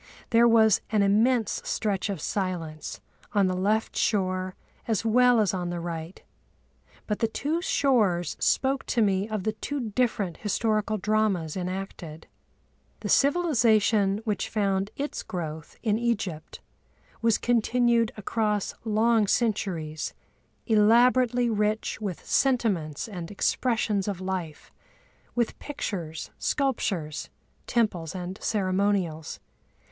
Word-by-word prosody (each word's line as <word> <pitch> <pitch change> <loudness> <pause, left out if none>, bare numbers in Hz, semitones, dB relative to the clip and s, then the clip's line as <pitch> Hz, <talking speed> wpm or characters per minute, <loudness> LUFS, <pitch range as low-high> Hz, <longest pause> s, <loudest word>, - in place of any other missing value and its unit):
There 235 0 +6
was 220 -3 +5
an 210 -2 +2
immense 220 +4 +2
stretch 205 -2 -1
of 195 -4 -3
silence 170 -6 -3 0.3
on 200 -2 +4
the 185 0 0
left 210 +4 0
shore 185 -3 0 0.3
as 225 -1 0
well 245 +1 +5
as 210 -3 +2
on 180 -2 -2
the 175 0 -3
right, 170 +1 -6 0.8
but 210 - -2
the 225 - +2
two 300 +9 -2
shores 210 - +2
spoke 270 +1 +1
to 235 - +1
me 195 +1 +1
of 215 -3 -3
the 215 - 0
two 235 +1 -4
different 205 -7 0
historical 215 0 0
dramas 200 -6 0
enacted. 180 -4 -5 0.8
The - - -4
civilisation 225 - +3
which 210 -3 -1
found 195 -2 0
its 285 +2 -3
growth 160 -3 -6
in 215 -2 +1
Egypt 200 -9 -3 0.6
was 230 -2 +3
continued 235 -1 +2
across 210 -1 -1
long 220 0 +2
centuries, 180 -9 -1 0.5
elaborately 240 +3 +4
rich 215 0 -1
with 195 -5 -5
sentiments 205 - +1
and 180 -6 -7
expressions 210 -1 0
of 200 -3 -3
life, 185 -5 -5 0.6
with 240 -2 -1
pictures, 180 - -5
sculptures, 195 - -1 0.4
temples, 195 -9 0
and 185 +2 -6
ceremonials. 190 -5 0
210 Hz, 115 wpm, -27 LUFS, 185-230 Hz, 0.8 s, There